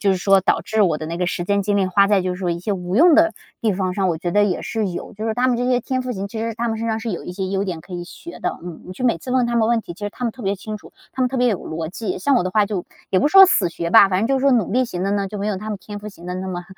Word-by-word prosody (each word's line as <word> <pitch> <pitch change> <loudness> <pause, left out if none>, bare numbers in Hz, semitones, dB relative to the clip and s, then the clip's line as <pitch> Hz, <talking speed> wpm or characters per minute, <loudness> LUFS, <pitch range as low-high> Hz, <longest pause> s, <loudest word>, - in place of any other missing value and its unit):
就 200 - +2
是 190 - +2
说 195 +1 +4
导 190 - +1
致 220 -1 +1
我 165 -6 +2
的 155 - -5
那 165 +1 -4
个 180 0 -1
时 175 0 -2
间 200 +2 +1
精 205 +1 0
力 195 -2 +2
花 200 +2 +3
在 205 -2 +4
就 185 0 -2
是 - - -9
说 180 -2 0
一 170 - -2
些 190 +4 -2
无 180 0 -3
用 330 +4 +7
的 325 +1 +5 0.3
地 220 -2 +1
方 185 -1 -2
上， 190 -1 +1
我 165 -2 -1
觉 175 +1 -3
得 205 - +4
也 190 -4 -1
是 220 -3 -2
有。 175 - -6
就 215 +2 -6
是 220 - -1
他 250 +2 +2
们 250 -2 +2
这 245 - -1
些 250 - +3
天 255 +2 -2
赋 255 - -4
型， 195 -2 -4
其 220 +3 -7
实 230 +1 -2
他 235 +2 -2
们 225 - -1
身 230 - -3
上 220 0 0
是 225 +1 -4
有 170 - -5
一 180 - -6
些 190 +1 -3
优 195 +1 -1
点 180 -4 -4
可 185 - -14
以 175 -1 -4
学 340 - -11
的， - - -2
嗯。 175 -3 -8
你 185 - -8
去 250 - -5
每 235 -9 +2
次 250 - -8
问 255 -1 +3
他 235 - -2
们 225 -1 +3
问 235 -1 +2
题， 175 - -8
其 - - -22
实 - - -1
他 250 - -6
们 230 - -1
特 255 - -13
别 195 0 0
清 215 +3 -6
楚， - - -15 0.2
他 265 - -6
们 250 - +2
特 265 - -4
别 250 0 +3
有 205 -6 0
逻 160 0 -5
辑， 215 +4 -4
像 280 -2 +2
我 - - +2
的 185 - -2
话 210 +2 +3
就 195 -4 -4 0.2
也 185 - +3
不 290 - +3
说 385 +4 +9
死 195 - +2
学 170 0 -4
吧， 195 - +8
反 185 -1 +1
正 220 - +1
就 270 +2 +1
是 - - -3
说 275 - +4
努 225 -6 +1
力 255 +2 +3
型 180 -5 -4
的 195 - 0
呢， 200 -1 0
就 210 - -7
没 200 - -2
有 210 -2 -1
他 215 +2 -7
们 210 -2 -4
天 205 +1 -8
赋 210 +1 -8
型 185 -4 -14
的 180 - -4
那 185 +1 -4
么 175 -1 -5
200 Hz, 410 characters per minute, -21 LUFS, 185-230 Hz, 0.3 s, 说